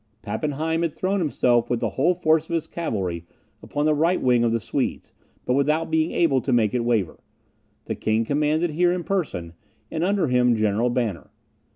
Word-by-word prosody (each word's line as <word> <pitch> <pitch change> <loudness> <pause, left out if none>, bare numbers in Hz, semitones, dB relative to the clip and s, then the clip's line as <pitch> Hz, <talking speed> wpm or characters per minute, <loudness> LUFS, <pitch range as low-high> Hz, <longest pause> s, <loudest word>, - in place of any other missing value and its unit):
Pappenheim 150 +9 -2
had 165 -3 -1
thrown 195 +2 0
himself 125 -7 +1
with 120 - 0
the - - -1
whole 170 +7 +2
force 160 -2 +1
of 170 - -1
his 160 -1 -1
cavalry 95 - -3 0.4
upon 145 +1 -2
the 155 - +3
right 165 +5 +2
wing 125 -2 +3
of 115 - +2
the 115 - +1
Swedes, - - -3 0.3
but 125 - +1
without 150 +4 +1
being 160 +1 +2
able 140 -7 +2
to 135 - -2
make 115 -4 +2
it 125 -2 0
waver. 115 -7 0 0.7
The 110 - -3
king 110 +2 0
commanded 150 +5 +1
here 175 +3 +2
in 180 -1 -3
person, 145 - -3 0.4
and 160 - -2
under 195 0 +1
him 125 -3 +3
General 110 +2 +1
Banner. 120 -7 -2
140 Hz, 190 wpm, -23 LUFS, 115-160 Hz, 0.7 s, the